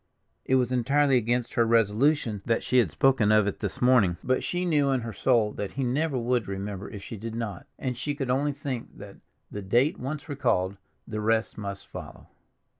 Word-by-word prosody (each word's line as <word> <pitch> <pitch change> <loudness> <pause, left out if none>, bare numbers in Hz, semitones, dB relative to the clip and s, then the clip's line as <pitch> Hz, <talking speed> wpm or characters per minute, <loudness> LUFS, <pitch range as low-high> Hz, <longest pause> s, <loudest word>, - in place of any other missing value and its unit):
It 130 - +2
was 125 -1 +2
entirely 135 +3 +3
against 120 0 0
her 120 - +3
resolution 115 +1 +2
that 115 -1 +1
she 130 - +3
had 110 -8 +3
spoken 120 - +3
of 110 -1 +5
it 100 - -3
this 105 -3 -4
morning, 115 -9 +4
but 130 0 +1
she 180 0 -1
knew 150 -5 +2
in 130 -2 +1
her 115 -1 -6
soul 115 -4 +2
that 100 -1 -5
he 135 - -2
never 135 +3 0
would 120 -2 0
remember 100 0 -5
if 100 -2 -9
she 115 - -7
did 115 +2 -6
not, 110 -6 -5
and 130 -2 -3
she 145 +4 -3
could 135 -4 -2
only 140 +3 +1
think 140 -4 -6
that, - - -11 0.3
the 105 - -5
date 120 - +2
once 140 +4 -5
recalled, 115 - 0 0.3
the 110 -1 -4
rest 110 +1 +1
must 100 -2 -6
follow. - - -10
120 Hz, 200 wpm, -27 LUFS, 105-135 Hz, 0.3 s, of